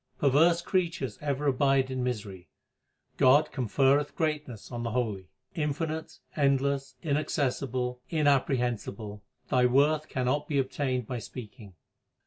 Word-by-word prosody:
Perverse 165 +5 +4
creatures 170 -8 -1
ever 145 -1 -2
abide 135 -1 +2
in 130 -1 -2
misery; 105 -7 -4 0.7
God 145 +4 +5
conferreth 135 +3 +2
greatness 150 - -3
on 120 -1 -4
the 120 - -2
holy. 110 -6 -2 0.3
Infinite, 155 +1 -3 0.2
endless, 140 -1 +1
inaccessible, 130 -4 -1
inapprehensible, 125 -8 0 0.3
Thy 125 -1 +4
worth 150 +4 +2
cannot 130 +3 -1
be 145 - -1
obtained 130 -2 -1
by 125 +1 -4
speaking. 110 -4 -10
135 Hz, 115 wpm, -28 LUFS, 125-150 Hz, 0.7 s, God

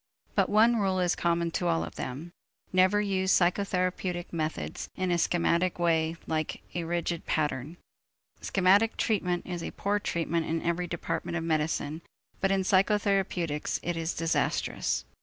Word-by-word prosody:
But - - +2
one 225 +3 +5
rule 190 -3 +1
is 180 -1 +2
common 170 -1 0
to 175 - -1
all 165 -1 +1
of - - -7
them: 145 +7 -6 0.4
never 185 +3 +4
use 190 -2 +1
psychotherapeutic 180 -1 0
methods 160 -1 -3
in 185 -1 -1
a 170 - +2
schematic 175 +1 +1
way 165 -1 +1
like 155 -1 -2
a 170 -1 -2
rigid 170 0 -2
pattern. 150 +1 -1 0.6
Schematic 200 +4 +3
treatment 180 -5 0
is 175 -2 -4
a - - -4
poor 205 +1 -1
treatment 170 -3 -1
in 165 +1 0
every 170 +1 0
department 170 0 -3
of 165 - -3
medicine, 155 -1 -1 0.4
but 195 - +2
in 195 0 +2
psychotherapeutics 190 -5 +1
it 175 0 -1
is 165 +1 -2
disastrous. 165 0 0
175 Hz, 150 wpm, -29 LUFS, 165-190 Hz, 0.6 s, one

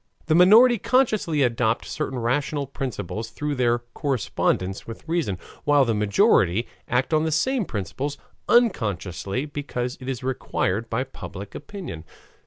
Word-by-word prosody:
The 155 - +2
minority 220 +8 +7
consciously 215 - +2
adopt 115 -1 +1
certain 140 -4 -3
rational 140 +4 0
principles 115 - -5
through 145 +5 -3
their 120 -3 +2 0.2
correspondence 100 - -1
with 115 +6 -9
reason, 160 - 0 0.3
while 145 -2 +4
the 115 - +1
majority 105 0 +3 0.2
act 125 +5 0
on 155 0 +3
the 160 - 0
same 235 - +1
principles 130 - -4 0.3
unconsciously 110 - +1
because 135 -4 -4
it 130 - -5
is 130 -1 -4
required 115 -4 -1
by 120 +3 0
public 100 -6 -9
opinion. 180 - -7
130 Hz, 135 wpm, -24 LUFS, 115-155 Hz, 0.3 s, minority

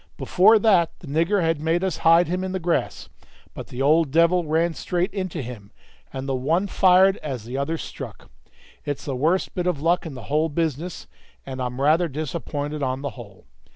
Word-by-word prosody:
Before 210 +5 +5
that 195 -6 +3
the - - -10
nigger 165 +7 +1
had 165 -2 0
made 165 +3 0
us 190 -2 -1
hide 165 +2 +5
him 180 +2 -2
in 190 0 -4
the 190 - -2
grass, 170 0 -2 0.5
but - - -8
the 125 +2 -4
old 155 +1 +3
devil 170 +4 +3
ran 165 +2 +1
straight 175 +2 -2
into 185 -7 -4
him, 115 -5 -9 0.4
and 135 0 -6
the 135 - -1
one 155 +9 0
fired 190 0 +4
as 130 -7 -6
the 120 +3 -7
other 160 +4 -1
struck. - - -9 0.5
It's 145 -1 -4
the 135 - -3
worst 160 +8 0
bit 180 -1 -2
of 175 -6 0
luck 170 +3 +1
in 145 - -8
the 130 - -9
whole 155 +6 0
business, 160 +2 -3 0.4
and 130 -1 -6
I'm 125 0 -4
rather 155 +5 +3
disappointed 150 0 -4
on 130 0 -2
the 140 - -3
whole. 105 -7 -13
160 Hz, 195 wpm, -23 LUFS, 140-180 Hz, 0.5 s, Before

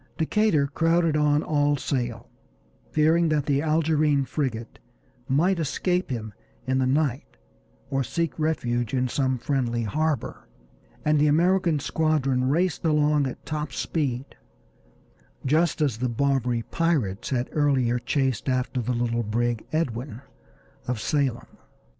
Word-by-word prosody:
Decatur 165 -2 +2
crowded 165 +2 +1
on 150 0 +2
all 145 -1 +1
sail, 120 -4 -3 0.6
fearing 160 +2 +3
that 150 -2 +1
the 140 -1 +1
Algerine 155 -2 +2
frigate 120 -6 -3 0.5
might 170 +7 +2
escape 180 +4 -1
him 110 -4 -4 0.3
in 130 0 +1
the 130 - +2
night 135 - -1 0.5
or 135 0 +1
seek 165 +4 -2
refuge 120 -6 -1
in 130 0 +1
some 130 0 0
friendly 120 -2 -1
harbor, 150 - -2 0.6
and 150 0 +3
the 150 - +4
American 170 +2 +3
squadron 135 -4 +1
raced 175 +4 0
along 150 -3 +2
at 130 - -8
top 150 -2 -3
speed, 135 -2 -2 1.2
just 155 +4 +2
as 135 -7 +1
the 125 0 0
Barbary 125 -1 0
pirates 140 - -1
had 125 -2 -1
earlier 130 -5 +2
chased 135 0 -1
after 130 0 -1
the 125 +2 -1
little 120 -1 0
brig 115 +1 -1
Edwin, 130 -5 -3 0.6
of 125 -2 -1
Salem. 135 -2 -2
140 Hz, 130 wpm, -25 LUFS, 125-155 Hz, 1.2 s, the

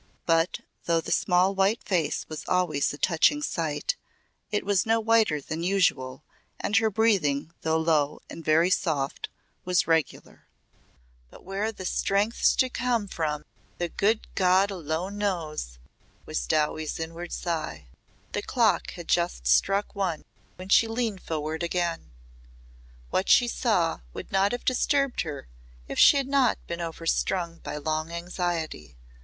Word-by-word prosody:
But, 165 +1 +2 0.2
though 170 -1 +2
the - - -6
small 185 +2 +3
white 195 +4 +1
face 165 -6 0
was 155 -1 -7
always 175 -6 +1
a 145 - -7
touching 190 - +3
sight, 160 - -1 0.5
it 210 - -1
was 200 -2 +2
no 225 0 +2
whiter 220 -8 +3
than 160 +3 -5
usual 170 -9 +1 0.4
and 210 - -1
her 220 0 +3
breathing 190 -9 +1
though 160 0 +1
low 155 -2 +1
and 165 - -9
very 160 +4 +3
soft 145 -7 -1 0.3
was 180 -1 +2
regular. 160 -2 -1 0.8
"But - - -15
where 200 +4 -2
the 190 -4 -9
strength's 200 +5 +2
to 260 - +3
come 245 -4 -1
from 150 -4 -2 0.3
the 175 -1 -2
good 215 +5 +1
God 190 +2 +3
alone 180 +3 -3
knows!" 160 - -3 0.5
was - - -3
Dowie's 155 +1 0
inward 165 +2 -6
sigh. 115 - -4 0.4
The - - -2
clock - - +1
had - - -9
just - - 0
struck 60 - +2
one 185 -6 -2 0.3
when 185 +1 -10
she 225 - +5
leaned 225 -4 -2
forward 155 0 -3
again. 170 - -2 1.0
What 190 - 0
she 245 - +6
saw 210 -9 +1
would - - -8
not 195 +1 +3
have 245 - -4
disturbed 275 +1 +1
her 150 - -6 0.4
if - - -4
she 285 - +8
had 275 -1 0
not 270 -4 +3
been 170 0 -5
overstrung 170 +1 -1
by - - -6
long 155 +1 -2
anxiety. 170 - -4
175 Hz, 145 wpm, -27 LUFS, 155-200 Hz, 1.0 s, she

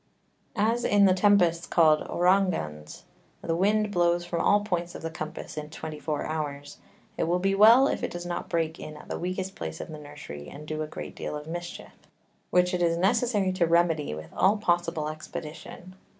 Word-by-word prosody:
As 230 +3 +1
in 205 -1 +4
the 185 - +5
Tempests 180 -4 +3
called 155 -3 +4
Ouragans 175 - 0 0.4
the 165 - -1
Wind 210 +3 +2
blows 175 -1 +2
from 170 -1 -2
all 205 0 +4
Points 175 -4 -3
of - - -8
the 165 - -3
Compass 155 0 -7
in 150 0 -5
twenty 155 -1 -7
four 150 -1 -3
Hours, 145 -2 -5 0.4
it - - +2
will 175 +2 +1
be 195 +2 +1
well 225 +6 +7
if - - -2
it - - -2
does 175 0 -6
not 175 0 -4
break 165 -1 -1
in 155 0 -8
at - - -14
the - - -3
weakest 185 +2 -3
Place 80 -1 -6
of - - -7
the 155 -1 -8
Nursery, 145 - -9
and 150 +1 -10
do 155 0 -3
a 155 - -3
great 155 - -7
deal - - -5
of 150 0 -6
Mischief, 175 +2 -7 0.6
which 180 0 +3
it 180 - 0
is 170 -1 +2
necessary 205 0 +2
to 175 -2 +2
remedy 165 - +2
with 80 0 -10
all 200 +3 +3
possible 175 -5 0
expedition. 155 +3 -8
170 Hz, 195 wpm, -27 LUFS, 155-185 Hz, 0.6 s, well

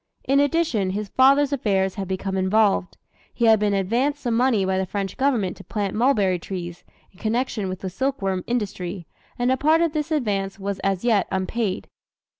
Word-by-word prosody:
In 275 +1 +2
addition, 285 - +1
his 205 +2 -3
father's 275 +2 +4
affairs 195 -7 +1
had 195 0 -5
become 190 +1 -3
involved. 190 0 +2 0.3
He 235 - 0
had 220 -1 +6
been 205 -1 +1
advanced 245 +10 0
some 240 -3 0
money 235 -5 +2
by 190 0 0
the 190 - 0
French 195 0 -3
Government 245 -9 0
to - - -11
plant 205 -3 -3
mulberry 210 -7 +2
trees, 175 -1 -6 0.3
in 185 - -22
connection 220 -3 -1
with 185 0 -6
the 190 - -3
silk 270 +7 -1
worm 190 -3 -1
industry, 190 -6 -3 0.3
and 245 +1 +1
a 260 - +2
part 310 +4 +3
of 335 -2 +1
this 305 -1 -2
advance 205 -9 -1
was 200 -1 -4
as 195 +2 -1
yet 220 -5 +3
unpaid. 190 +1 -2
210 Hz, 190 wpm, -23 LUFS, 190-255 Hz, 0.3 s, had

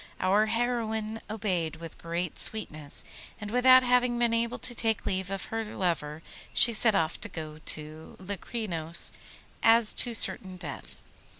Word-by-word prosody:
Our 200 +4 +3
heroine 225 -2 -2
obeyed 185 -7 -2
with 165 0 -10
great 170 0 -3
sweetness, 155 -9 -1 0.4
and 210 -1 -6
without 255 +1 +6
having 250 -1 +2
been 235 -1 +1
able 235 +1 0
to 245 - -1
take 225 -2 -1
leave 190 -1 -1
of 195 -1 -4
her 225 0 -1
lover 165 -7 -3 0.3
she 235 - +7
set 220 -1 +4
off 165 -3 0
to 225 - +1
go 155 -3 -7
to 155 +1 -3
Locrinos 185 -4 -2 0.5
as 225 -1 +5
to 240 -2 +1
certain 190 -2 -1
death. 155 -6 -8
205 Hz, 145 wpm, -28 LUFS, 170-230 Hz, 0.5 s, she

